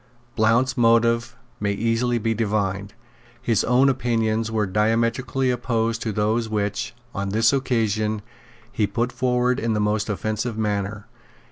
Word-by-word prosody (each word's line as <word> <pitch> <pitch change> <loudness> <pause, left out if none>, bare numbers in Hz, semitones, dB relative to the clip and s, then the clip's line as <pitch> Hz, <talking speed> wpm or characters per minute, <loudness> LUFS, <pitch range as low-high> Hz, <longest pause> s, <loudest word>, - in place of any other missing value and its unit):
Blount's 115 +4 +2
motives 115 0 +3 0.2
may 100 -1 0
easily 115 +3 0
be 115 0 0
divined. 100 -2 -2 0.4
His 115 -3 +1
own 125 +3 +4
opinions 115 -4 0
were 110 -1 0
diametrically 115 +6 +1
opposed 115 -2 -1
to 110 - -2
those 110 +2 0
which, 105 +2 -2 0.2
on 100 0 -3
this 110 +4 +3
occasion, 110 -5 0 0.5
he 110 -5 0
put 120 +2 -1
forward 125 0 +1
in 115 -1 0
the 105 - 0
most 105 +1 0
offensive 110 +3 -2
manner. 105 -1 -2
115 Hz, 135 wpm, -23 LUFS, 105-120 Hz, 0.5 s, own